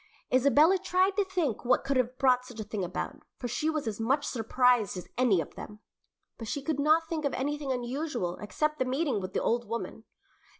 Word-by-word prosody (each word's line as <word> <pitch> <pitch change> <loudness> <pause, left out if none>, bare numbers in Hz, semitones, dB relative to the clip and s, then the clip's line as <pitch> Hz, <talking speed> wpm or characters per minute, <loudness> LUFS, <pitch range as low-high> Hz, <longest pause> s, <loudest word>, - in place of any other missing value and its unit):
Isabella 290 +8 +5
tried 375 +1 +2
to 410 - +4
think 355 - -2
what 250 +1 +2
could 275 0 -1
have 255 0 0
brought 255 -2 +3
such 245 -3 -11
a - - -2
thing 205 -1 -4
about, 180 +10 -4 0.2
for 245 - -4
she 300 +6 -1
was 310 -3 -2
as 220 -2 -3
much 270 +6 +1
surprised 245 -3 +2
as 180 - -7
any 240 -8 +3
of 160 - -5
them, 210 - -9 0.6
but 225 - -6
she 285 +2 -3
could 310 -1 -1
not 315 +3 +3
think 320 -2 -3
of 280 - 0
anything 290 +1 -2
unusual 250 - -2
except 305 +8 -2
the 260 - +1
meeting 260 -4 0
with 185 0 -6
the - - 0
old 235 -1 0
woman. 230 -1 -5
255 Hz, 210 wpm, -29 LUFS, 230-300 Hz, 0.6 s, Isabella